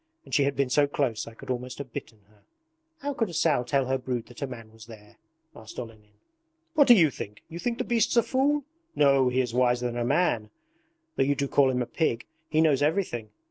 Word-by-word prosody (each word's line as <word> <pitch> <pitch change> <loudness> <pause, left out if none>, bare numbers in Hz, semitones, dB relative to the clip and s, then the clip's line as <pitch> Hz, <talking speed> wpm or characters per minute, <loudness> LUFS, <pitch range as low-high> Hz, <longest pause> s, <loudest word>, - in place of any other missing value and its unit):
And - - -13
she 140 - +4
had 140 0 0
been 135 -2 0
so 145 +2 +4
close 130 -6 -1
I 115 - -10
could 130 - -7
almost 125 0 -4
have 130 -4 -8
bitten 110 -2 -8
her.' 105 0 -27 0.6
'How 285 +1 -2
could 225 -6 -1
a 170 - -7
sow 150 -6 +2
tell 135 +2 0
her 130 +1 0
brood 125 -2 -3
that 120 +2 -14
a 140 - -1
man 115 -4 -10
was 110 0 -15
there?' 105 -2 -14 0.4
asked 110 0 -12
Olenin. 110 -3 -9 0.6
'What 295 -4 +5
do 240 - +9
you 165 -8 +5
think? 105 -3 -8
You 170 - -7
think 235 +4 -2
the - - -1
beast's 235 0 +1
a 235 - +6
fool? 285 +3 +1 0.3
No, 140 -3 +4
he 130 +1 +1
is 125 -2 -3
wiser 125 0 +2
than 120 0 -2
a 120 - 0
man 120 -5 +1 0.7
though - - +4
you 140 +1 +1
do 140 0 -1
call 135 -1 +4
him 125 -1 0
a - - -5
pig! 120 -1 -1 0.2
He 155 0 +2
knows 150 -4 +3
everything. 145 - 0
130 Hz, 235 wpm, -27 LUFS, 120-155 Hz, 0.7 s, do